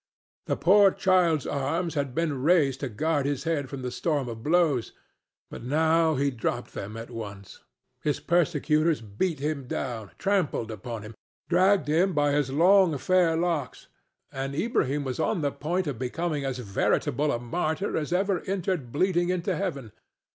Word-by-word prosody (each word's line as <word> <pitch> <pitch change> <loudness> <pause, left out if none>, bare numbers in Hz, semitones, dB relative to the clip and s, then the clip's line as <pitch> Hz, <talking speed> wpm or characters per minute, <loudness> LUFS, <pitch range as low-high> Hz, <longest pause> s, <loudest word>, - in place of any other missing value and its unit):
The - - 0
poor 200 +3 +6
child's 185 -6 +2
arms 160 +5 -1
had 140 -4 -2
been 155 -5 -1
raised 145 -4 +3
to 135 - -3
guard 145 +5 0
his 145 -2 -2
head 155 -5 -1
from 135 -2 -6
the 125 - -3
storm 145 -2 -1
of 115 -1 -7
blows, 155 -5 +1 0.6
but - - -8
now 160 +4 +2
he 140 +1 +1
dropped 115 -4 -3
them 105 +3 -6
at 115 +2 -8
once. 100 -4 -8 0.4
His 150 - -1
persecutors 160 -2 +2
beat 115 - -2
him 140 -2 -3
down, 115 -6 -4
trampled 185 - 0
upon 110 +1 -6
him, 110 +1 -9 0.4
dragged 185 +1 +3
him 175 +5 +2
by 145 -1 +2
his 145 -2 +1
long 175 +2 +4
fair 170 +3 +2
locks, 165 -6 -2 0.4
and 135 +1 -4
Ilbrahim 145 - 0
was 130 0 -4
on 175 +3 0
the 145 -1 0
point 175 +7 -2
of 140 -6 -4
becoming 150 +4 -2
as 135 -2 -2
veritable 125 +5 0
a - - 0
martyr 160 +9 -2
as 155 0 -2
ever 190 0 +1
entered 185 -9 -2
bleeding 175 +3 +1
into 180 -2 -1
heaven. 140 - -4
150 Hz, 165 wpm, -27 LUFS, 130-175 Hz, 0.6 s, poor